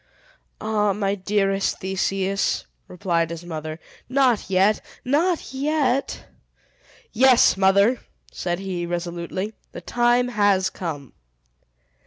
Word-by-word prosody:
"Ah, 210 Hz, -2 st, +1 dB
my 200 Hz, 0 st, -1 dB
dearest 195 Hz, 0 st, 0 dB
Theseus," 190 Hz, +1 st, -1 dB, 0.2 s
replied 170 Hz, -3 st, -1 dB
his 170 Hz, +1 st, -7 dB
mother 155 Hz, -1 st, -6 dB, 0.3 s
"not 255 Hz, -6 st, +2 dB
yet! 195 Hz, +3 st, +3 dB, 0.2 s
not 315 Hz, +4 st, 0 dB
yet!" 275 Hz, -1 st, 0 dB, 0.9 s
"Yes, 255 Hz, +1 st, +5 dB
mother," 200 Hz, +5 st, +3 dB, 0.3 s
said 175 Hz, -1 st, -3 dB
he, 185 Hz, -2 st, -4 dB
resolutely, 175 Hz, +4 st, -4 dB, 0.2 s
"the -, -, -7 dB
time 240 Hz, +1 st, +2 dB
has 205 Hz, -4 st, +2 dB
come!" 145 Hz, -7 st, -6 dB
195 Hz, 100 wpm, -23 LUFS, 180-240 Hz, 0.9 s, Yes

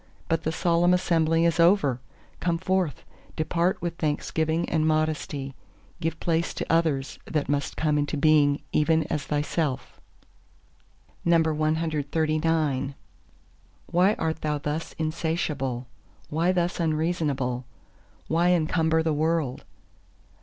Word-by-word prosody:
But 165 Hz, -1 st, +1 dB
the 160 Hz, -, -1 dB
Solemn 175 Hz, +2 st, +3 dB
Assembly 165 Hz, -2 st, +2 dB
is 170 Hz, 0 st, +1 dB
over! 165 Hz, -8 st, +4 dB, 0.4 s
Come 170 Hz, -1 st, 0 dB
forth, 185 Hz, -4 st, -1 dB, 0.3 s
depart 170 Hz, +3 st, 0 dB
with 170 Hz, -1 st, -3 dB
thanksgiving 160 Hz, +2 st, -1 dB
and 155 Hz, -1 st, +1 dB
modesty—give 155 Hz, 0 st, -3 dB
place 165 Hz, 0 st, 0 dB
to -, -, -3 dB
others 155 Hz, -5 st, 0 dB
that 150 Hz, -3 st, -1 dB
must 145 Hz, 0 st, -1 dB
come 150 Hz, -2 st, +1 dB
into 145 Hz, +1 st, -1 dB
being 145 Hz, -1 st, +3 dB
even 160 Hz, +1 st, +3 dB
as 150 Hz, -4 st, -1 dB
thyself. 150 Hz, -1 st, -2 dB, 1.2 s
CXL 155 Hz, -3 st, +1 dB, 1.0 s
Why 185 Hz, +4 st, +4 dB
art 160 Hz, 0 st, -2 dB
thou 150 Hz, -1 st, 0 dB
thus 150 Hz, +2 st, -4 dB
insatiable? 155 Hz, -5 st, -2 dB, 0.5 s
why 165 Hz, +4 st, +2 dB
thus 175 Hz, -1 st, 0 dB
unreasonable? 155 Hz, -6 st, -1 dB, 0.6 s
why 170 Hz, +2 st, +2 dB
encumber 160 Hz, -1 st, +2 dB
the 160 Hz, -1 st, +1 dB
world? 155 Hz, -3 st, -1 dB
160 Hz, 110 wpm, -26 LUFS, 150-165 Hz, 1.2 s, over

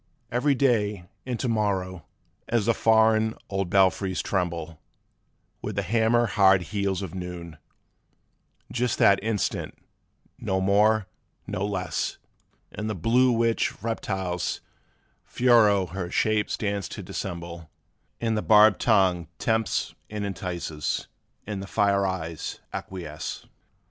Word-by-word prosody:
'Every 135 Hz, +4 st, +2 dB
to 140 Hz, -, +1 dB
day 105 Hz, -6 st, 0 dB, 0.2 s
and 125 Hz, -3 st, -2 dB
to -, -, -1 dB
morrow, 95 Hz, -6 st, -1 dB, 0.4 s
as 115 Hz, -3 st, +1 dB
the 115 Hz, -, +3 dB
foreign 110 Hz, 0 st, +3 dB
old 95 Hz, -2 st, -2 dB
belfries 95 Hz, 0 st, +2 dB
tremble 85 Hz, -4 st, -2 dB, 0.8 s
With 105 Hz, -, -4 dB
the 100 Hz, -, 0 dB
hammer 115 Hz, +4 st, +2 dB
hard 95 Hz, -4 st, +4 dB
heels 100 Hz, -1 st, -1 dB
of 95 Hz, -, -6 dB
noon, 90 Hz, -3 st, -7 dB, 1.1 s
just 125 Hz, -1 st, 0 dB
that 100 Hz, -1 st, +4 dB
instant, 110 Hz, -3 st, -2 dB, 0.6 s
nor 95 Hz, 0 st, -1 dB
more 105 Hz, +2 st, +3 dB, 0.4 s
nor 95 Hz, -, -2 dB
less, 90 Hz, -5 st, -2 dB, 0.5 s
In 105 Hz, -, -5 dB
the 110 Hz, -, -2 dB
blue 120 Hz, +8 st, +3 dB
witch 115 Hz, -1 st, +1 dB
reptile's 95 Hz, -6 st, -2 dB, 0.6 s
furrow 110 Hz, -6 st, +4 dB
her 90 Hz, 0 st, -5 dB
shape 110 Hz, +2 st, +1 dB
stands 100 Hz, -2 st, -2 dB
to -, -, -7 dB
dissemble, 85 Hz, -2 st, -6 dB, 0.5 s
And 115 Hz, -1 st, 0 dB
the 105 Hz, -, 0 dB
barbed 105 Hz, -2 st, +6 dB
tongue 90 Hz, -4 st, +3 dB
tempts 110 Hz, -2 st, 0 dB, 0.2 s
and 105 Hz, -1 st, -4 dB
entices, 85 Hz, -5 st, -3 dB, 0.4 s
and 100 Hz, -2 st, -4 dB
the 95 Hz, -, -7 dB
fire 100 Hz, 0 st, +2 dB
eyes 85 Hz, -4 st, -4 dB
acquiesce. 85 Hz, -5 st, -6 dB
100 Hz, 125 wpm, -26 LUFS, 90-110 Hz, 1.1 s, barbed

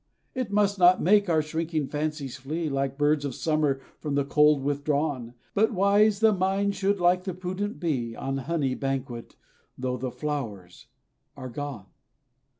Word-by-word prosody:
It 255 Hz, -6 st, -3 dB
must 200 Hz, -1 st, +2 dB
not 180 Hz, +1 st, +6 dB
make 205 Hz, +1 st, +4 dB
our 160 Hz, -2 st, +3 dB
shrinking 160 Hz, 0 st, -2 dB
fancies 150 Hz, -3 st, -3 dB
flee, 155 Hz, +4 st, -3 dB
Like 135 Hz, -1 st, -2 dB
birds 145 Hz, 0 st, +2 dB
of 140 Hz, -3 st, -3 dB
summer 150 Hz, -4 st, 0 dB, 0.2 s
from 145 Hz, -2 st, -3 dB
the 140 Hz, -1 st, +1 dB
cold 150 Hz, -1 st, +4 dB
withdrawn; 145 Hz, -3 st, -1 dB, 0.2 s
But 220 Hz, +3 st, +2 dB
wise, 200 Hz, +2 st, +4 dB
the 220 Hz, -1 st, +5 dB
mind 195 Hz, +1 st, +1 dB
should, 195 Hz, +1 st, 0 dB
like 180 Hz, +1 st, +3 dB
the 185 Hz, -2 st, -4 dB
prudent 185 Hz, +3 st, -4 dB
bee, 125 Hz, -9 st, -2 dB
On 135 Hz, 0 st, -3 dB
honey 140 Hz, -1 st, -1 dB
banquet, 130 Hz, -3 st, -4 dB, 0.4 s
though 125 Hz, 0 st, -2 dB
the 130 Hz, -, -3 dB
flowers 120 Hz, -9 st, -5 dB, 0.5 s
are 130 Hz, -, -6 dB
gone. 135 Hz, -5 st, -6 dB
150 Hz, 155 wpm, -26 LUFS, 135-185 Hz, 0.5 s, not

